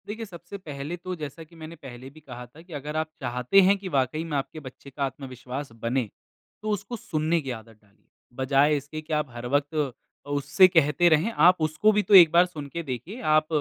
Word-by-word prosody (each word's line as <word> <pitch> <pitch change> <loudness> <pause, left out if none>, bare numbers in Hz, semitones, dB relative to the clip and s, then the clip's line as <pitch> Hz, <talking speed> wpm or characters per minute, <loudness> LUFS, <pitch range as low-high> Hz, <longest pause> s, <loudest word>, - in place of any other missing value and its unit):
देखिए 225 +2 -5
सबसे 175 0 -10
पहले 150 -3 -6
तो 185 +1 -6
जैसा 155 0 -8
कि 160 +2 -19
मैंने 160 0 -10
पहले 130 -4 -11
भी 150 +3 -16
कहा 125 -5 -10
था 135 +7 -17
कि 170 0 -14
अगर 150 +1 -6
आप 155 0 -1
चाहते 125 +9 +3
हैं 195 +2 +4
कि 195 -1 -8
वाक़ई 135 +4 0
में 160 -3 -3
आपके 140 +3 -5
बच्चे 140 -1 -12
का 140 +1 -4
आत्मविश्वास 130 0 -7
बने, 120 -1 -1 0.5
तो 215 - -4
उसको 210 +3 -3
सुनने 160 -3 -1
की 135 -3 -5
आदत 115 0 -17
डालिए। 100 0 -31 0.3
बजाए 140 +3 +3
इसके 145 +3 -7
कि 155 +1 -6
आप 150 -2 0
हर 120 0 -8
वक़्त 145 +3 0
अ, 145 -1 -5
उससे 145 +6 +4
कहते 165 -1 +3
रहें 160 +8 +2
आप 180 -2 +5
उसको 155 +8 +2
भी 210 0 +2
तो 205 - 0
एक 170 -4 +9
बार 175 +1 +6
सुन 155 -5 -8
के 170 - -3
देखिए 155 - -6
आप 155 0 +3
150 Hz, 220 wpm, -26 LUFS, 135-170 Hz, 0.5 s, एक